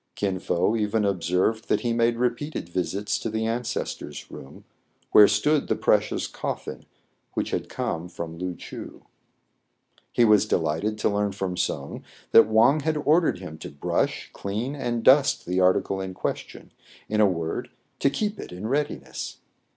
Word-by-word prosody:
Kin 95 -2 -1
Fo 90 +4 +1
even 105 -1 +1
observed 95 +4 0
that - - +2
he 120 -2 0
made 115 0 +2
repeated 125 - -2
visits 95 +3 -2
to - - -3
the 110 +1 -1
ancestors' 115 -10 -4
room, 70 +2 -11 0.5
where 105 - +9
stood 150 +8 +2
the - - +1
precious - - +1
coffin - - -5 0.5
which - - -1
had - - -2
come 85 +2 -3
from 85 -1 -6
Loo 90 +1 -4
Choo. - - -9 1.1
He 120 - +4
was 105 -1 +5
delighted 85 +5 0
to 110 - +1
learn 105 -1 0
from 95 -2 -3
Soun - - -3 0.3
that 115 - +8
Wang 120 +7 +5
had 155 +1 0
ordered 155 - +3
him 90 -4 -9
to - - -7
brush, 70 0 -2
clean, 110 +7 -3
and 120 -4 -2
dust 135 +2 +5
the 90 +1 0
article 95 +1 +2
in 95 -1 -5
question; - - -5 0.4
in 110 0 +1
a 105 - +6
word, 85 -3 -3 0.3
to 140 - +3
keep 210 +8 -2
it - - -8
in 90 +4 -7
readiness. 145 +4 -3
105 Hz, 160 wpm, -25 LUFS, 90-120 Hz, 1.1 s, where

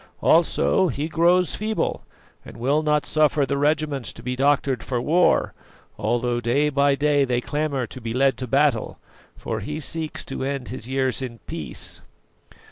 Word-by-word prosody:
Also 175 +3 +3
he 150 -2 -2
grows 170 +2 +3
feeble, 215 +1 -2 0.4
and - - -12
will 140 +6 +1
not 150 -1 +1
suffer 150 -2 +2
the 140 - -1
regiments 145 -3 0
to - - -13
be 125 +1 -2
doctored 135 -2 +1
for 125 -2 -2
war, 165 +8 +2 0.4
although 120 0 0
day 135 +6 +2
by 140 0 +3
day 145 0 +2
they 125 -2 0
clamour 145 -1 -2
to 130 +3 -10
be 115 0 -4
led 135 +3 +2
to 130 - -5
battle; 135 -2 +1 0.4
for - - -4
he 150 +1 -5
seeks 160 0 -4
to 135 - -5
end 135 -2 -3
his 120 -2 -6
years 130 0 0
in 120 -3 -5
peace." - - -6
140 Hz, 165 wpm, -23 LUFS, 130-150 Hz, 0.4 s, Also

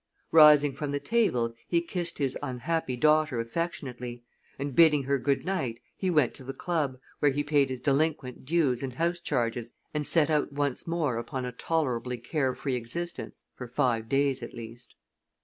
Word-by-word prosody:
Rising 150 -3 +7
from 145 +2 -4
the 145 - -1
table 135 - +1
he 170 - +2
kissed 170 0 -3
his 135 -3 +1
unhappy 140 +1 -2
daughter 150 -2 +3
affectionately, 125 -3 -4 0.3
and, 140 -1 -4
bidding 150 -4 +6
her 140 +1 +1
good 140 +3 0
night, 135 -12 -2 0.2
he 190 - -1
went 150 -8 +3
to - - -10
the 135 +1 -6
club, 150 -5 -1 0.2
where 145 - +4
he 145 +2 -1
paid 145 -2 +2
his 130 -1 -4
delinquent 140 -2 0
dues 140 -4 +1
and 135 -2 -4
house 170 +5 0
charges 120 -6 -2 0.2
and 150 -1 -1
set 160 -2 +3
out 150 -1 +1
once 140 0 -2
more 160 -8 0
upon 130 +2 -4
a 125 - -4
tolerably 125 -3 -1
care 130 +2 -1
free 135 - -3
existence 125 +9 -5
for 125 - -8
five 120 -3 0
days 135 -1 +1
at 120 - -8
least. 115 +1 -10
140 Hz, 175 wpm, -28 LUFS, 125-155 Hz, 0.3 s, Rising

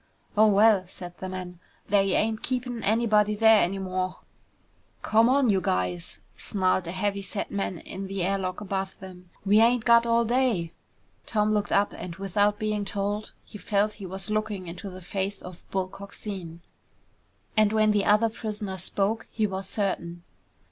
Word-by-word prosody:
"Oh, 215 +1 +6
well," 205 -2 +5
said 175 -1 -10
the 185 - -5
man, 180 -2 -7 0.3
"they 195 -1 +3
ain't 220 0 0
keepin' 250 -2 -3
anybody 210 -1 +2
there 220 0 +6
anymore!" 185 0 -2 0.8
"Come 225 +2 +4
on 265 -3 +4
you 190 -2 +2
guys," 90 - -2
snarled 185 -3 0
a - - -3
heavy 200 +2 -1
set 195 +1 -4
man 195 -3 -2
in 195 +1 -7
the 195 -1 -3
air 195 +2 0
lock 185 +1 -4
above 195 -1 -3
them. 180 -1 -12 0.2
"We 205 +2 +5
ain't 235 0 +3
got 235 0 +6
all 235 0 +3
day!" 235 -9 +1 0.5
Tom 215 -1 +1
looked 210 -1 0
up, 200 +1 +2
and 170 -2 -7
without 205 +2 +1
being 215 -1 -1
told, 205 +1 -3
he 210 - -11
felt 210 +1 +1
he 190 - -5
was 190 +2 -5
looking 215 -3 -2
into 180 +3 -7
the 185 0 -10
face 195 +2 -3
of 180 -1 -11
Bull 190 -1 -1
Coxine. 190 -3 -8 0.9
And 215 -1 +4
when 215 -1 +3
the 205 -1 +2
other 215 +2 +4
prisoner 210 -3 -5
spoke, 205 +5 0
he 220 - 0
was 190 -1 -4
certain. 175 -4 -2
200 Hz, 170 wpm, -26 LUFS, 185-215 Hz, 0.9 s, Oh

